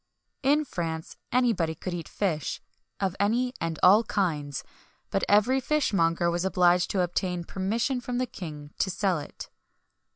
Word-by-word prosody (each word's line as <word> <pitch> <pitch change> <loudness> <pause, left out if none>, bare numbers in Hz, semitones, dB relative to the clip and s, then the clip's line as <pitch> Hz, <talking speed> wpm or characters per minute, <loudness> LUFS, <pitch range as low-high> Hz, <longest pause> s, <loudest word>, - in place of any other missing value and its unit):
In 295 +2 +3
France, 165 - -4 0.2
anybody 225 -10 +2
could 180 +3 -5
eat 170 -3 -5
fish, 160 -8 -1 0.4
of 195 -2 -1
any 240 +5 +1
and 165 -1 -2
all 205 +5 +7
kinds; 155 -10 -1 0.5
but - - 0
every 210 +6 +4
fishmonger 175 - +1
was 175 +1 -1
obliged 180 -1 +3
to 190 - +1
obtain 180 0 -1
permission 220 +9 -1
from 245 0 -3
the 255 - +1
king 150 -9 -8
to 190 - +1
sell 190 -2 0
it. 145 - -9
185 Hz, 150 wpm, -27 LUFS, 170-230 Hz, 0.5 s, all